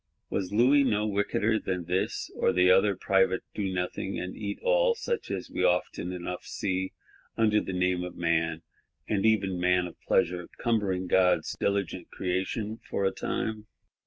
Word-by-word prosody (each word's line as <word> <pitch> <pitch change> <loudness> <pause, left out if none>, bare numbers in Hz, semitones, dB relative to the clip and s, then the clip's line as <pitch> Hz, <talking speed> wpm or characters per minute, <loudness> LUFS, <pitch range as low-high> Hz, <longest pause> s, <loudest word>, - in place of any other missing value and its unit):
—Was 95 -1 -2
Louis 130 +7 +5
no 105 -5 +1
wickeder 105 +1 +1
than 90 -2 -3
this 90 +2 -1
or - - +2
the 90 0 +4
other 95 +1 +4
private 95 -1 +2
Donothing 95 -1 -2
and 90 0 -5
Eatall; - - +1
such 470 0 -3
as - - -4
we - - -1
often 90 0 +1
enough 90 0 -5
see, 95 -1 -2 0.4
under 105 -1 +3
the - - -5
name 90 -1 +1
of 90 - -6
Man, 80 -1 0 0.4
and 105 0 +1
even 95 -4 +2
Man 90 0 +3
of 85 - -10
Pleasure, 90 0 +1
cumbering 100 -6 0
God's 90 0 +2
diligent 95 -3 -1
Creation, 95 +4 -2
for 100 - 0
a 95 - +3
time? 110 -1 -3
95 Hz, 155 wpm, -28 LUFS, 90-105 Hz, 0.4 s, Louis